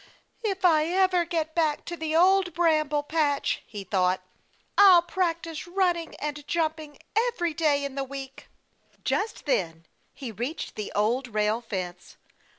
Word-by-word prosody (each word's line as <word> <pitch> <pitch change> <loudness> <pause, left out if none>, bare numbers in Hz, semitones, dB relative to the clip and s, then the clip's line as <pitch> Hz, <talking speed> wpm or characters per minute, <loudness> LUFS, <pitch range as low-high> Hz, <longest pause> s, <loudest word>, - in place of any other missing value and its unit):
"If 390 -3 -1
I 310 -3 +5
ever 365 0 +2
get 320 -2 -2
back 315 -3 0
to 345 - -5
the 320 -1 -3
Old 365 0 +4
Bramble 310 -4 +2
Patch," 295 -2 0
he 205 -2 -7
thought, 185 -1 +1 0.6
"I'll 375 -4 +8
practice 335 -3 -2
running 350 -2 0
and 295 0 -5
jumping 315 -3 -2 0.2
every 445 -8 +1
day 290 -3 +1
in 280 - -5
the 275 0 -2
week." 270 0 -8 0.6
Just 440 +2 -2
then, 165 - -1 0.3
he 265 -4 -7
reached 245 - -4
the 210 - -5
Old 235 +6 +1
Rail 215 0 0
Fence. 180 -6 -6
310 Hz, 145 wpm, -26 LUFS, 260-345 Hz, 0.6 s, I'll